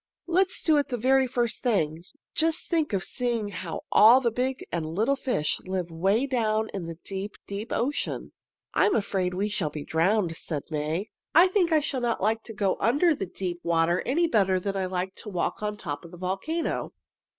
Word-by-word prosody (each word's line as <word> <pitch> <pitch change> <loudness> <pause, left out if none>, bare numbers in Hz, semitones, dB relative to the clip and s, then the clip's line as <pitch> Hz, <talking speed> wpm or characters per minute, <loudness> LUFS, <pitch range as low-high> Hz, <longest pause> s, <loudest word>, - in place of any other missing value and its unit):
"Let's 370 +2 +1
do 315 -2 +4
it 290 - +1
the 245 - -2
very 265 +3 +3
first 240 -2 0
thing. 165 - +1 0.3
Just 325 0 +1
think 320 -5 +1
of 195 -2 0
seeing 235 -4 -1
how 180 -4 -5
all 230 +5 +8
the 240 -3 0
big 255 +3 -2
and 170 -2 -1
little 230 +8 +2
fish 250 - 0
live 185 -2 -2
'way 195 +10 +2
down 220 -4 0
in 185 -4 -4
the 165 -1 -7
deep, 195 +1 -5
deep 205 +4 -6
ocean!" 275 +5 -2 0.4
"I - - +4
am 410 - +2
afraid 185 -3 0
we 200 +3 0
shall 195 -7 -1
be 150 0 -7
drowned," 170 +1 +1
said 150 -3 -4
May. 155 +7 -2 0.2
"I 350 +3 +8
think 365 -3 +2
I 310 -1 +4
shall 275 -3 -2
not 235 -1 0
like 220 +3 +1
to 225 - -8
go 200 -2 +1
under 290 - +3
the 195 -10 -4
deep 180 -1 -4
water 170 +1 +2
any 330 +7 +2
better 195 - +2
than 195 +1 -3
I 190 -1 -1
liked 185 +1 -3
to - - -7
walk 180 +1 -2
on 210 0 -2
top 145 -7 -5
of 170 - -11
the 175 - -12
volcano." 195 - -2
210 Hz, 205 wpm, -27 LUFS, 180-260 Hz, 0.4 s, all